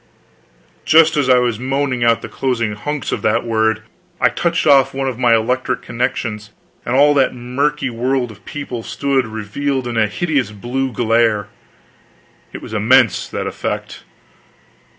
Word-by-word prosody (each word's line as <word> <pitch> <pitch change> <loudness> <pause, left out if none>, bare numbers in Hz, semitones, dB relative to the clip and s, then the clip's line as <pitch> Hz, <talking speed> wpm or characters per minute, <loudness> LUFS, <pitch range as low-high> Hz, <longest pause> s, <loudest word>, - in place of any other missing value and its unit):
Just 160 0 +5
as 140 -3 +1
I 125 - +6
was 120 -3 0
moaning 135 -1 -1
out 115 -1 +2
the - - -5
closing 115 -5 -2
hunks 145 +7 -4
of - - -2
that 110 +2 +1
word, 110 -1 0 0.4
I - - +4
touched 170 -1 -1
off 135 -2 +4
one 135 0 -1
of 125 -2 -4
my 120 -2 +4
electric 125 +2 -1
connections 115 -3 -3 0.3
and 120 - -2
all 145 +2 +5
that 135 -3 +2
murky 130 +3 -1
world 125 +1 -1
of 105 -1 -16
people 135 -5 -6
stood 135 +1 -1
revealed 120 +5 -3
in 120 -1 -3
a 110 -1 +3
hideous 140 -1 -1
blue 125 +5 -3
glare! 115 -3 +1 1.0
It - - -9
was - - -9
immense 115 +1 +3
that - - -4
effect! - - -5
125 Hz, 155 wpm, -18 LUFS, 115-135 Hz, 1.0 s, I